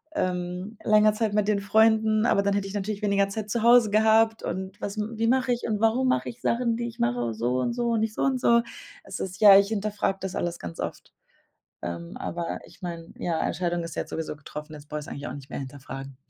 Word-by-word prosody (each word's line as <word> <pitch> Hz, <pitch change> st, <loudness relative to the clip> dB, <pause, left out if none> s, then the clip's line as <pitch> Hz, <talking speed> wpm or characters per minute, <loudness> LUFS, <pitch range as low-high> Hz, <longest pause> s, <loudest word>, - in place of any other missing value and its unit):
ähm, 180 Hz, 0 st, -3 dB
länger 215 Hz, 0 st, +5 dB
Zeit 215 Hz, -1 st, -1 dB
mit 210 Hz, -1 st, +1 dB
den 205 Hz, -1 st, +2 dB
Freunden, 220 Hz, +1 st, +3 dB
aber 200 Hz, -, +3 dB
dann 200 Hz, 0 st, +1 dB
hätte 200 Hz, -1 st, -1 dB
ich 195 Hz, -, -8 dB
natürlich 205 Hz, +1 st, -3 dB
weniger 200 Hz, -1 st, +2 dB
Zeit 210 Hz, +1 st, -5 dB
zu 235 Hz, -, 0 dB
Hause 235 Hz, -2 st, +6 dB
gehabt. 220 Hz, +1 st, +4 dB
Und 190 Hz, +3 st, -5 dB
was 200 Hz, +1 st, -4 dB
wie 220 Hz, +1 st, -1 dB
mache 255 Hz, +1 st, +2 dB
ich 240 Hz, -, -4 dB
und 210 Hz, -2 st, -1 dB
warum 240 Hz, +4 st, +3 dB
mache 255 Hz, -, +1 dB
ich 240 Hz, 0 st, -11 dB
Sachen, 235 Hz, -1 st, +1 dB
die 235 Hz, 0 st, -2 dB
ich 235 Hz, -, -9 dB
mache 120 Hz, -1 st, 0 dB
so 120 Hz, +3 st, 0 dB
und 235 Hz, -, 0 dB
so 240 Hz, -1 st, 0 dB
und 225 Hz, -, +1 dB
nicht 220 Hz, 0 st, -1 dB
so -, -, -1 dB
und 265 Hz, -1 st, +1 dB
so? 235 Hz, -1 st, +5 dB, 0.4 s
Es -, -, -7 dB
ist 185 Hz, +1 st, -5 dB
ja, 200 Hz, -2 st, +10 dB
ich 200 Hz, -, +2 dB
hinterfrag 210 Hz, -2 st, -1 dB
das 190 Hz, -1 st, -4 dB
alles 175 Hz, 0 st, -2 dB
ganz 85 Hz, -1 st, -8 dB
oft. -, -, -6 dB, 0.7 s
Ähm, 85 Hz, 0 st, -6 dB
aber 170 Hz, -1 st, -4 dB
ich -, -, -18 dB
mein, 170 Hz, -1 st, -7 dB
ja, 165 Hz, -2 st, -1 dB
Entscheidung 175 Hz, 0 st, -1 dB
ist 165 Hz, -, -7 dB
ja -, -, 0 dB
jetzt -, -, -14 dB
sowieso 160 Hz, -1 st, -4 dB
getroffen, 150 Hz, +1 st, -9 dB
jetzt 145 Hz, 0 st, -12 dB
brauche 150 Hz, 0 st, -4 dB
ich 150 Hz, -, -10 dB
es -, -, -15 dB
eigentlich 140 Hz, +1 st, -6 dB
auch -, -, -6 dB
nicht 140 Hz, -1 st, -11 dB
mehr -, -, -4 dB
hinterfragen. 135 Hz, 0 st, -8 dB
200 Hz, 245 wpm, -26 LUFS, 165-220 Hz, 0.7 s, ja